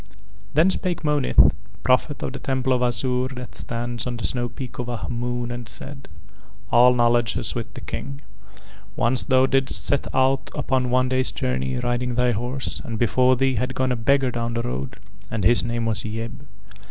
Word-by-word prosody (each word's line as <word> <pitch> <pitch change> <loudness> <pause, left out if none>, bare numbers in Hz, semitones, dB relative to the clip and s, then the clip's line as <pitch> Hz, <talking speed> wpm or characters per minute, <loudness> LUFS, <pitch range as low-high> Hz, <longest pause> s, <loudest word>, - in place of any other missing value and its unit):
III 95 -1 -24 0.4
Then 160 +5 +5
spake 180 -2 -2
Monith, 150 -3 +4 0.3
Prophet 130 +3 +1
of - - -3
the 135 - -6
Temple 130 -1 0
of 125 - +1
Azure 125 +1 +1
that 125 0 -8
stands 120 0 -3
on 120 -1 -3
the 115 - -7
snow 120 +6 0
peak 125 +1 -8
of 120 - -3
Ahmoon 120 +1 -3
and 120 -1 -6
said: 135 +4 -9 0.6
"All 125 +1 +6
knowledge 120 -1 +2
is - - -1
with - - -5
the - - -7
King. 140 0 -6 0.8
Once 125 +1 +3
thou 130 -1 +4
didst 135 0 +1
set 140 - +1
out 130 +1 +2
upon 130 -3 0
a - - -2
one 130 +1 +3
day's 130 0 +1
journey 65 0 -2
riding 120 - -1
thy 125 0 +3
horse 120 +4 -3
and 115 -2 -4
before 125 +3 +3
thee 135 +1 +2
had 125 +3 -2
gone 130 0 +1
a - - +1
beggar 130 +3 +2
down 115 0 -3
the 115 - -1
road, 65 +2 -4 0.3
and 110 -3 -3
his 115 +5 +5
name 115 -1 -2
was 110 -1 -1
Yeb. 115 +1 -4
125 Hz, 190 wpm, -23 LUFS, 115-130 Hz, 0.8 s, All